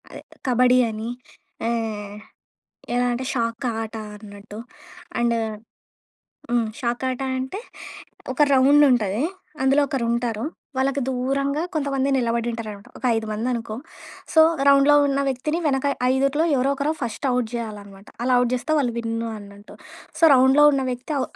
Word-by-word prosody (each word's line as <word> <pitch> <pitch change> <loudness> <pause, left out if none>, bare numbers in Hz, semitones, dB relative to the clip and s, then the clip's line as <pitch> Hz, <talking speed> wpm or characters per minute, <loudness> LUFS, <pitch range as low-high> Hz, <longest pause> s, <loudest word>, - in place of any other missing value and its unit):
అదే - - -9 0.3
కబడ్డీ 250 0 +4
అని. 220 +1 -5 0.6
ఆహ్, 215 -3 -3 0.8
ఎలా 245 0 +2
అంటే 255 +2 -4
షాక్ 230 +1 -2 0.2
ఆట 225 0 -6 0.2
అన్నట్టు. 205 0 -11 0.6
అండ్ 235 0 +2 1.2
హ్మ్. 240 -1 +2
షాకాటా 255 +1 -2
అంటే, 265 +9 -4 0.7
ఒక 300 - +2
రౌండ్ 280 +3 +6
ఉంటది. 215 -1 0 0.4
అందులో 270 +2 +4
ఒకరుంటారు. 235 -3 -1 0.3
వాళ్ళకి 275 +1 +1
దూరంగా 275 +3 -1
కొంతమంది 275 -3 0
నిలబడి 235 -2 0
ఉంటారనమాట. 215 -3 -7
ఒక - - -17
ఐదు 225 0 -2
మంది 220 +4 -2
అనుకో. 225 -2 -4 0.6
సో, 320 - +6 0.3
రౌండ్‌లో 280 +1 +6
ఉన్న 275 0 0
వ్యక్తిని, 270 +5 -1
వెనక 270 -1 +1 0.3
ఐదుట్లో 275 +4 +1
ఎవరో 265 +2 +1
ఒకరు 290 +2 0
ఫస్ట్ 240 +3 -3
ఔట్ 250 -2 0
జెయాలనమాట. 205 -4 -7 0.2
అలా 255 0 +3
ఔట్ 245 0 0
జెస్తే 255 +5 -2
వాళ్ళు 250 -5 0
విన్ను 230 0 -3
అన్నట్టు. 200 0 -13 0.4
సో, - - +6
రౌండ్‌లో 265 +3 +5
ఉన్న 270 -1 0
వ్యక్తి 250 +5 -4
ఔ - - +1
245 Hz, 140 wpm, -23 LUFS, 225-270 Hz, 1.2 s, రౌండ్